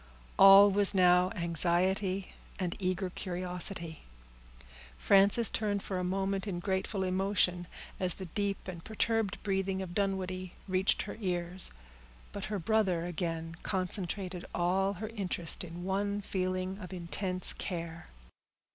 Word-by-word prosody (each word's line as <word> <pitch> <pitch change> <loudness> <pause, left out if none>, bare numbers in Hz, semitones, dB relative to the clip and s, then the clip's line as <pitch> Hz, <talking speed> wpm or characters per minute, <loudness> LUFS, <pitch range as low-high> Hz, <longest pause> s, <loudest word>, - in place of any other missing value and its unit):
All 195 +1 +9
was 200 0 +5
now 180 0 +5
anxiety 185 +3 +1 0.3
and 180 -3 -2
eager 185 0 -2
curiosity. 180 -3 -3 1.0
Frances 200 - +5
turned 205 -2 -2
for 190 -2 -3
a - - -2
moment 195 +2 -1
in 180 -3 -3
grateful 190 +1 -2
emotion, 185 -2 0 0.3
as 185 -2 +4
the 190 - -7
deep 200 +3 -3
and 170 -3 -7
perturbed 220 -2 -1
breathing 195 -1 -1
of 185 -2 -6
Dunwoodie 185 -2 -2
reached 185 +1 +1
her - - -8
ears; 180 -1 0 0.6
but 200 - -6
her 215 -1 -3
brother 190 -3 +1
again 165 -1 -4
concentrated 185 -1 -2
all 190 +3 +1
her 210 +3 -6
interest 190 -7 -2
in 175 0 -8
one 200 +2 -1
feeling 185 0 -2
of 185 -3 -9
intense 180 +1 0
care. 170 -2 -6
185 Hz, 130 wpm, -31 LUFS, 180-195 Hz, 1.0 s, All